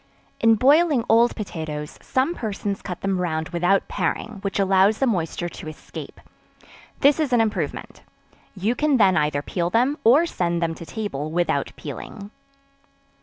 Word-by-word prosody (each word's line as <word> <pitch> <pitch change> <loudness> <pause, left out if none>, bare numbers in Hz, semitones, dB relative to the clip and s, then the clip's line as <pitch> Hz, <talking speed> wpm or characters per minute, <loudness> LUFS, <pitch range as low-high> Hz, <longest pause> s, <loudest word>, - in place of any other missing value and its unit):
In 225 -1 +5
boiling 285 +2 +4
old 235 +2 +4
potatoes, 155 -7 -6
some 265 +6 0
persons 205 - -4
cut 180 -3 -6
them 195 -2 -1
round 160 -1 -2
without 180 +2 +1
paring, 220 -3 -3
which 195 -1 -3
allows 195 +2 +4
the 270 - +1
moisture 175 -6 -1
to 160 - -10
escape; 155 - -9 0.8
this 285 +2 +5
is 300 -4 0
an 245 - +4
improvement: 220 -2 -2 0.5
you 205 +5 0
can 295 +1 +2
then 195 -5 +4
either 150 -1 0
peel 175 +1 -2
them 250 +9 +1
or 275 +9 +6
send 175 - -1
them 165 -1 -1
to 165 0 -10
table 180 -10 -4
without 175 +1 0
peeling. 205 0 -8
195 Hz, 155 wpm, -23 LUFS, 170-235 Hz, 0.8 s, or